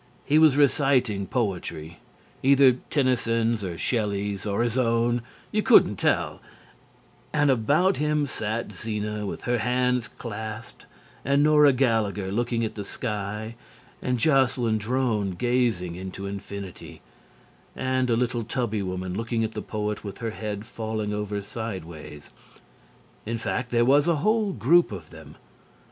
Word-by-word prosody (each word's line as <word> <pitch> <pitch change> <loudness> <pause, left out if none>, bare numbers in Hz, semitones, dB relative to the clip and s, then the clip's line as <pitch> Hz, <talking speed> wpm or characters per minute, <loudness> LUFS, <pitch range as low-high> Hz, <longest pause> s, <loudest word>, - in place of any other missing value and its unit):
He 150 +2 +4
was 155 -3 +5
reciting 135 -8 +2
poetry 85 -8 -3 0.4
either 135 -2 +5
Tennyson's 115 -5 +1
or 90 -3 -4
Shelley's, 100 -3 -1
or 100 +3 +1
his 120 -1 -1
own, 120 -1 +2 0.3
you - - +1
couldn't - - +5
tell - - 0 0.9
and 145 -2 +3
about 145 - +2
him 150 0 +1
sat 110 -3 -3
Zena 105 -1 -4
with - - -6
her 120 -1 0
hands 125 0 +1
clasped 110 0 -8 0.4
and 140 +2 +3
Nora 150 -1 +6
Gallagher 110 -7 0
looking 115 +1 0
at 110 - -4
the 105 - -5
sky 105 +1 -4 0.5
and 125 0 0
Jocelyn 125 -4 +2
Drone 110 -4 0
gazing 115 -6 0
into 95 +2 -7
infinity, 100 -1 -7 0.7
and 130 -1 0
a 115 - +3
little 120 -1 0
tubby 115 -2 -2
woman 90 -1 -4
looking 115 +1 -1
at 110 - -2
the - - -5
poet 105 -1 -3
with 100 -2 -7
her 115 -1 -3
head 105 -1 -5
falling 110 -2 -3
over 105 -1 -3
sideways 85 -10 -7 1.0
in 115 +1 -1
fact, 120 +2 -3
there 120 -1 +3
was 140 +4 +4
a 170 - +3
whole 215 -2 +2
group 170 +1 +3
of 85 -6 -8
them. 80 -2 -12
115 Hz, 140 wpm, -25 LUFS, 105-125 Hz, 1.0 s, Nora